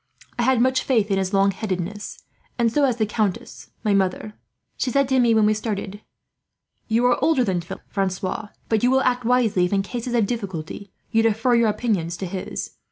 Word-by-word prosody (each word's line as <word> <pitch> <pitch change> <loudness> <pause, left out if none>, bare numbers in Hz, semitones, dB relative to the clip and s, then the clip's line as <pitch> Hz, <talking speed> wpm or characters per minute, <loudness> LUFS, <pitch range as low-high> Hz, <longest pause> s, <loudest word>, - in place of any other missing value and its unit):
I - - +3
had 255 0 +3
much 255 +1 +3
faith 220 -6 +1
in 195 - +2
his 190 -1 -1
long 195 0 +3
headedness; 195 0 -5 0.3
and 235 -2 +1
so 290 -1 +3
has 250 -3 0
the 220 - +1
countess, 185 - -3
my 210 - +2
mother. 195 +2 0 0.4
She - - -1
said 275 +2 +2
to 265 -1 +3
me, 235 -2 +4
when 220 -1 +4
we 215 - +4
started: 210 -2 -4 0.9
"'You 230 +2 +2
are 245 -1 +2
older 315 -6 +3
than 185 -5 0
Philip, 170 - -9
Francois; 195 +2 -2 0.2
but 220 -2 +1
you 245 - +3
will 265 +1 +3
act 250 -2 0
wisely 225 -7 +3
if, 180 - -2
in 195 -1 +2
cases 240 +3 -4
of 230 -3 +3
difficulty, 200 -4 -5 0.2
you 225 -1 +3
defer 225 +2 +2
your 235 -2 +4
opinions 195 -7 -1
to 190 - -4
his. 185 +1 -5
215 Hz, 205 wpm, -23 LUFS, 195-240 Hz, 0.9 s, me